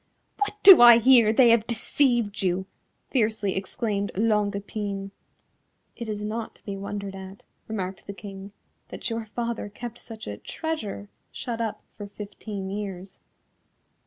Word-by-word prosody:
"What 410 0 -1
do 385 -8 +11
I 240 -1 +10
hear, 235 -2 +6
they 235 +1 +6
have 230 -1 +3
deceived 235 -2 +1
you," 185 0 0 0.5
fiercely 215 -5 +1
exclaimed 200 +1 -2
Longue 210 -1 +1
Epine. 200 -1 -4 0.8
"It 235 -2 -6
is 210 -1 -3
not 220 +1 -4
to - - -23
be 200 - -4
wondered 200 0 -5
at," 190 +1 -10 0.2
remarked 190 -3 -5
the 200 - -5
King, 195 +1 -9 0.4
"that 250 - -5
your 225 0 -3
father 235 -1 -4
kept 240 +3 -8
such 225 -2 -9
a 105 - -6
treasure 220 - -5 0.2
shut 235 -2 -4
up 225 -2 -3
for 205 - -8
fifteen 200 -1 -7
years." 195 -2 -6
210 Hz, 145 wpm, -26 LUFS, 200-230 Hz, 0.8 s, do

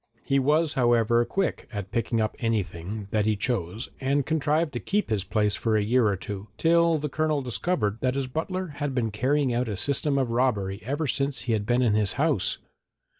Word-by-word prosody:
He 135 0 +2
was, 150 +4 +2
however, 120 -2 +3
quick 195 +4 -2
at 100 -3 -5
picking 115 0 0
up 110 -1 0
anything 105 -3 -2
that 105 -1 +1
he 110 - +2
chose 105 -2 -2
and 140 +1 +1
contrived 155 0 +1
to 120 - -2
keep 205 - -1
this 105 -4 0
place 105 +1 +1
for 110 -2 +1
a 105 - +1
year 120 +2 +3
or 100 - +1
two, 100 +2 -6
till 170 0 +4
the 150 0 -3
Colonel 155 0 0
discovered 120 - -1
that 130 0 +1
his 140 -1 -1
butler 170 +7 -3
had 145 -2 -1
been 115 -4 0
carrying 130 +4 +1
out 120 0 0
a 105 - -2
system 140 +7 +1
of 130 -4 0
robbery 105 -6 0
ever 145 +7 -2
since 140 +1 -1
he 120 - -1
had 105 -1 -1
been 125 +1 +3
in 115 -4 +3
his 105 -2 +2
house. - - +1
120 Hz, 205 wpm, -26 LUFS, 105-145 Hz, -, till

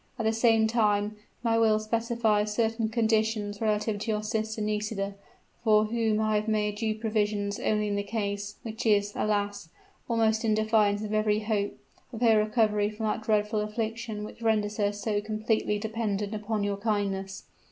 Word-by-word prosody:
At 225 - -2
the 220 - +2
same 225 -1 +4
time 210 -2 +1 0.3
my 230 -1 +2
will 220 -1 +4
specifies 220 -1 0
certain 225 -1 +1
conditions 220 -2 0
relative 210 -1 0
to 215 +3 -4
your 210 -1 0
sister 220 0 -2
Nisida, 210 -1 -2 0.5
for 215 -2 +5
whom 220 -1 0
I 215 -1 +2
have 210 +1 -2
made 210 -1 0
due 220 0 -1
provision 210 -2 0
only 210 -1 +1
in 205 - -1
the 200 - 0
case 205 -1 -3
which 225 0 -4
is, 205 -1 +3
alas! 205 -4 -1 0.4
almost 225 -1 +2
in 220 -2 +2
defiance 215 -1 +2
of 215 0 -4
every 215 0 +2
hope! 210 -2 -1 0.3
of 230 -2 -7
her 225 -3 +5
recovery 215 -1 +2
from 215 +1 -5
that 215 +1 -1
dreadful 215 0 +1
affliction 220 0 -3
which 215 - -9
renders 215 -2 +1
her 205 -1 +2
so 205 0 -2
completely 215 0 0
dependent 210 -1 -2
upon 215 0 -2
your 200 0 -1
kindness.' 195 -2 -2
215 Hz, 170 wpm, -28 LUFS, 210-220 Hz, 0.5 s, for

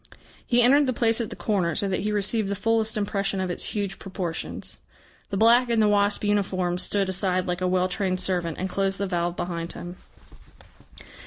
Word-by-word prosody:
He 245 0 +3
entered 280 +3 +5
the 255 - +1
place 230 0 +2
at 225 - -3
the - - -7
corner, 180 -7 0
so 200 - 0
that 190 -1 -1
he 210 - -1
received 210 0 0
the 200 - -1
fullest 220 +1 0
impression 200 -1 -1
of 185 -1 -1
its - - -2
huge 200 -2 -3
proportions. 180 -4 -4 0.5
The 195 - -2
black 235 +3 +5
in 230 -1 +2
the 215 - +4
wasp 205 0 +2
uniform 185 -4 0
stood 200 +1 +1
aside 185 -1 0
like 180 0 -3
a 185 - +1
well 185 0 +2
trained 185 -1 -1
servant, 175 -4 -1
and 190 - -2
closed 195 +1 -1
the 200 - -1
valve 175 -2 -1
behind 170 -1 -4
him. 175 +1 -8
195 Hz, 195 wpm, -25 LUFS, 180-210 Hz, 0.5 s, entered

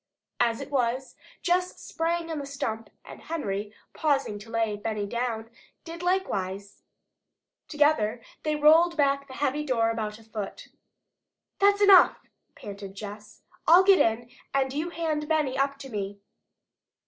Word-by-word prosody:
As 230 -1 +1
it - - -8
was, 255 -1 -1 0.3
Jess 360 0 0
sprang 335 0 -2
on 315 - -3
the 280 - -5
stump 225 -5 -4 0.2
and - - -11
Henry, 210 -10 -4 0.2
pausing 275 -9 0
to 215 +2 -13
lay 225 -2 0
Benny 210 0 -3
down, 230 0 -3 0.3
did 335 0 -8
likewise. 200 - -2 0.9
Together 290 -7 +2 0.2
they 305 -1 -1
rolled 325 +3 +5
back 280 -1 +2
the 260 - -10
heavy 290 +1 -1
door 230 -5 +1
about 215 -2 -4
a 225 - -17
foot. 215 -2 -7 0.9
"That's 405 +1 +4
enough," 390 -3 +7 0.4
panted 200 -1 -9
Jess. 210 +1 -10 0.2
"I'll 345 +3 +8
get 390 0 +6
in, 235 +2 +1 0.2
and 265 -1 +1
you 310 +4 -2
hand 315 -3 -2
Benny 305 -4 +1
up 275 +1 0
to 275 -1 -10
me." 200 -2 -5
265 Hz, 145 wpm, -27 LUFS, 220-315 Hz, 0.9 s, I'll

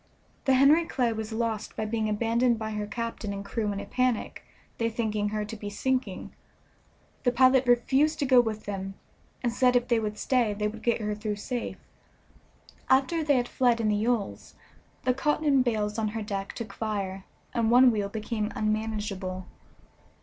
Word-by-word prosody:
The 265 -2 +4
Henry 290 +6 +5
Clay 245 -7 0
was 220 0 -5
lost 220 -1 -2
by 220 - -2
being 220 0 -1
abandoned 230 +3 +2
by 220 0 -4
her 210 -1 -3
captain 230 -1 -4
and 200 0 -6
crew 210 0 -2
in 200 - -3
a - - -6
panic, 255 -3 -1 0.4
they 230 0 +1
thinking 215 -2 -1
her 210 0 -2
to 220 +2 -7
be 205 -1 -6
sinking. 260 +5 -2 0.9
The 245 - +2
pilot 260 +1 +4
refused 265 +6 +3
to 285 - 0
go 255 -2 +6
with 220 -2 -4
them, 195 -1 -5 0.5
and 240 -2 0
said 250 0 +3
if 245 0 +2
they 235 -2 +3
would 210 -1 -3
stay 235 -5 +1
they 210 +1 0
would 215 +1 -7
get 235 -1 +1
her 210 0 -1
through 210 0 -3
safe. 240 +4 -4 1.1
After 275 +5 +3
they 290 -3 +3
had 245 -1 0
fled 245 -2 +2
in 220 -2 +1
the 210 - +2
yawls, 220 -1 -2 0.5
the 255 - +3
cotton 290 0 +2
bales 215 -3 -1
on 220 - 0
her 215 +1 -3
deck 200 -2 -4
took 215 -4 -7
fire, 195 -3 -3 0.3
and 230 -2 +1
one 250 +1 +7
wheel 205 -3 -1
became 215 +1 -3
unmanageable. 210 -4 -2
225 Hz, 180 wpm, -27 LUFS, 210-250 Hz, 1.1 s, one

